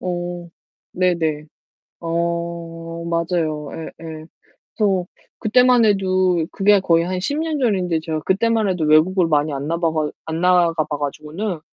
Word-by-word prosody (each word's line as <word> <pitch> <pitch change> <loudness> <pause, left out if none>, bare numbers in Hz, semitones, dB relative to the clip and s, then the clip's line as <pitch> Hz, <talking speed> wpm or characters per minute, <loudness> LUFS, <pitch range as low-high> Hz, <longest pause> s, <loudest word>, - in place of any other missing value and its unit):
어. 175 -1 -4 0.4
네네. 165 -4 0 0.6
어. 170 0 -3
맞아요. 165 -3 -1
예예. 160 -1 -8 0.5
그래서 195 -4 +1 0.3
그때만 250 +1 +4
해도 185 -4 +2
그게 205 0 +4
거의 170 -3 +2
한 185 +1 -2
10 285 +11 -2
년 315 -2 -2
전인데 185 -9 +1
제가 155 -1 -3
그때만 220 +4 +1
해도 180 -4 -1
외국을 165 +4 +4
많이 150 -1 +1
안 140 +2 -4
나바가 160 -2 0
안 160 +1 -3
나가 180 -2 +4
봐 150 -1 -4
가지고는 155 +6 -4
170 Hz, 255 characters per minute, -20 LUFS, 160-185 Hz, 0.6 s, 그때만